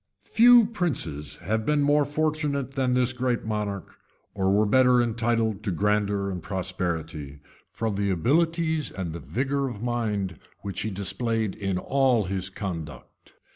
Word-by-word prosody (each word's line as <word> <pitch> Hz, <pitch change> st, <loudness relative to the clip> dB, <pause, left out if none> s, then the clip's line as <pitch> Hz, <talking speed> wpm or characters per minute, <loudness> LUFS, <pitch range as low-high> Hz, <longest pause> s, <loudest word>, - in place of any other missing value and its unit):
Few 240 Hz, 0 st, +8 dB
princes 145 Hz, -, -3 dB
have 110 Hz, +5 st, 0 dB
been 150 Hz, +4 st, +2 dB
more 145 Hz, 0 st, +3 dB
fortunate 150 Hz, -3 st, -1 dB
than 130 Hz, -2 st, +1 dB
this 125 Hz, 0 st, +2 dB
great 125 Hz, -2 st, -1 dB
monarch, 105 Hz, -3 st, -3 dB, 0.4 s
or 95 Hz, -1 st, +1 dB
were 105 Hz, +2 st, +4 dB
better 125 Hz, +3 st, +5 dB
entitled 115 Hz, -2 st, 0 dB
to 105 Hz, -, -2 dB
grandeur 100 Hz, +1 st, 0 dB
and 90 Hz, -2 st, -5 dB
prosperity, 80 Hz, -6 st, -4 dB, 0.3 s
from 110 Hz, -2 st, -2 dB
the 100 Hz, 0 st, 0 dB
abilities 160 Hz, -, +1 dB
and 90 Hz, -4 st, -5 dB
the 85 Hz, -, -6 dB
vigor 135 Hz, -, -1 dB
of 110 Hz, -2 st, -7 dB
mind 105 Hz, -, -2 dB, 0.2 s
which 100 Hz, -1 st, -5 dB
he 110 Hz, -, -1 dB
displayed 110 Hz, +2 st, -2 dB
in 95 Hz, -3 st, -2 dB
all 130 Hz, +1 st, +2 dB
his 95 Hz, 0 st, -3 dB
conduct. 85 Hz, -8 st, -7 dB
110 Hz, 145 wpm, -26 LUFS, 95-135 Hz, 0.4 s, Few